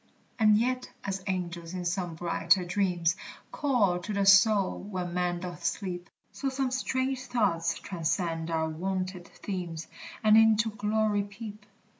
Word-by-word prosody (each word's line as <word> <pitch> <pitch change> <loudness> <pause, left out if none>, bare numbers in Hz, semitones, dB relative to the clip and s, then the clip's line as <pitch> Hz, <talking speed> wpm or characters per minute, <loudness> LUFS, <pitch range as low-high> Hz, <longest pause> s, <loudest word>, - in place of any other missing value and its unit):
And 215 -1 +6
yet, 255 +3 0
as 195 -1 -3
angels 175 -2 -3
in 180 -1 -4
some 175 -1 -2
brighter 170 +1 +2
dreams 175 -2 +1 0.4
Call 225 -11 +2
to 205 +4 -5
the 200 -1 +1
soul 195 0 +5
when 185 -3 -4
man 175 -1 0
doth 175 -1 -7
sleep, 180 -3 -3 0.2
So 275 - -2
some 265 -1 -1
strange 260 0 -1
thoughts 170 -9 +1
transcend 165 -2 -2
our 160 -1 0
wonted 185 +2 -3
themes, 175 -5 -5 0.4
And 215 0 +6
into 220 0 +5
glory 210 0 +1
peep. 205 +1 -9
190 Hz, 140 wpm, -29 LUFS, 175-215 Hz, 0.4 s, And